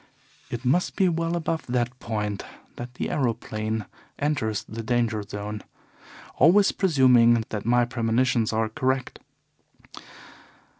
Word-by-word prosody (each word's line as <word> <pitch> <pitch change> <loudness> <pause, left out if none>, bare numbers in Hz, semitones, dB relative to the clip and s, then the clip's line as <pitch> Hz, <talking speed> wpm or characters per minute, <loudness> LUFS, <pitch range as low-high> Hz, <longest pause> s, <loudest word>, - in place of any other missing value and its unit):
It 120 +2 -5
must 170 +9 +1
be 190 - +3
well 165 0 -1
above 165 -1 -2
that 125 0 -1
point 105 -3 -3 0.3
that 120 +1 -8
the - - -3
aeroplane 110 -4 -2 0.3
enters 130 -8 -1
the 115 +2 -7
danger 115 -2 0
zone 105 +1 -6 0.8
always 195 +5 +5
presuming 125 - +4
that 105 -2 -4
my 120 0 +4
premonitions 120 -1 +1
are 110 0 +1
correct. 130 +3 -2
120 Hz, 115 wpm, -25 LUFS, 110-130 Hz, 0.8 s, always